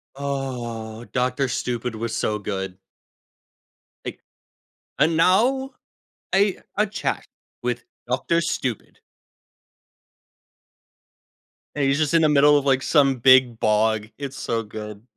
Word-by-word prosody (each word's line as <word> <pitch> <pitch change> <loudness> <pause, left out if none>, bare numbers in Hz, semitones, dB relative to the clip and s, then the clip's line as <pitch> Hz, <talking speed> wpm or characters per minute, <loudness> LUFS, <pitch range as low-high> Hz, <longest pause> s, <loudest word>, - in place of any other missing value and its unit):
Oh, 120 -5 -5
Doctor 125 +3 0
Stupid 120 0 -3
was 110 0 -3
so 105 -2 -1
good. 95 -2 -4 1.3
Like - - -6 0.8
"And 160 +3 +3
now 245 +11 +3 0.6
a 195 0 +3 0.2
a 210 - +3
chat 205 +1 -3 0.4
with 120 -1 -2 0.2
Doctor 130 +7 +1
Stupid." 130 -8 -3 2.8
And 145 - 0
he's 135 +1 +2
just 150 -1 +1
in 165 - +5
the 155 - +5
middle 145 0 +6
of, 140 - -1
like, 135 -1 +3
some 135 -3 +3
big 125 -1 +5
bog, 110 0 +1
it's 140 -1 -6
so 115 -1 -2
good. 105 0 -8
130 Hz, 115 wpm, -23 LUFS, 115-145 Hz, 2.8 s, middle